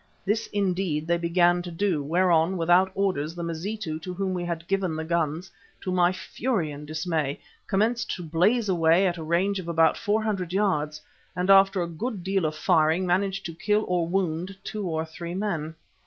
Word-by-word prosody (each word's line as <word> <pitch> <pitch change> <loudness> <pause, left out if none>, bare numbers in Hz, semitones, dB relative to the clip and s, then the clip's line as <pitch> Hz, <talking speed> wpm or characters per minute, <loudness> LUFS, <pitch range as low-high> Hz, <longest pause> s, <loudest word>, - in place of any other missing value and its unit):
This, 215 +3 0
indeed, 185 -6 -1
they 170 +1 +1
began 175 +1 +3
to 175 - -7
do, 175 -2 0
whereon, 170 +2 +2
without 175 +3 +4
orders, 175 -5 -1
the 170 - -5
Mazitu 170 0 -4
to 180 +3 -6
whom 190 0 -1
we 180 -1 -2
had 170 -1 -4
given 195 -4 0
the 160 - -3
guns, 165 +2 -1 0.3
to 185 - -3
my 180 -1 +3
fury 185 - -2
and 145 +1 -9
dismay, 155 -2 -2 0.3
commenced 215 +3 +1
to 180 - -7
blaze 190 +9 +2
away 170 0 +4
at 175 -2 0
a - - -5
range 185 +5 +1
of 175 - -7
about 165 -1 +3
four 215 0 0
hundred 190 -5 -2
yards, 155 -7 0 0.4
and 180 +2 +2
after 195 -1 +5
a - - -3
good 195 +4 -5
deal 190 -2 0
of 155 0 -1
firing 160 +2 +2
managed 190 +2 0
to 165 - -5
kill 210 +5 0
or 175 -2 0
wound 180 +1 -2
two 210 -3 -4
or 160 -1 -1
three 170 +2 -7
men. 170 -6 -3
175 Hz, 190 wpm, -26 LUFS, 165-195 Hz, 0.4 s, after